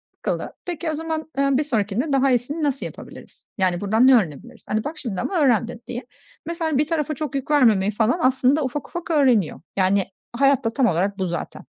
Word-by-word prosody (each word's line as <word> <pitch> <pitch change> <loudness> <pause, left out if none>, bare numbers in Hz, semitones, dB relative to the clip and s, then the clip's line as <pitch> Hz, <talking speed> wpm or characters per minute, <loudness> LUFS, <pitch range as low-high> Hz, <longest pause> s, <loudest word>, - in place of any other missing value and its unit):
yıkıldı. - - -3
Peki, 340 -2 -3
o 310 - -3
zaman, 315 0 -4
eee, 275 0 +2
bir 300 - +1
sonrakinde 235 +1 -1
daha 270 0 +3
iyisini 255 +6 -1
nasıl 280 -2 -1
yapabiliriz? - - -11
Yani, 180 -2 +1
buradan 220 +5 +3
ne 265 - +8
öğrenebiliriz? 160 - -2
Hani, 215 +1 0
bak 310 +2 -5
şimdi 230 -10 -4
ama 370 - -1
öğrendin." 240 -3 +1
diye. 245 0 -5 0.4
Mesela, 330 -3 -1
bir 295 +2 +2
tarafa 310 -2 -1
çok 285 -1 -4
yük 275 +2 -3
vermemeyi 220 -9 +4
falan 225 - +1
aslında 260 +3 +3
ufak 270 +2 -4
ufak 345 -1 -5
öğreniyor. 250 - +2 0.2
Yani, 190 0 +2 0.3
hayat 275 +1 +3
da - - +3
tam 265 -3 +2
olarak 195 +3 0
bu 190 - 0
zaten. 175 - -5
260 Hz, 200 wpm, -22 LUFS, 215-300 Hz, 0.4 s, ne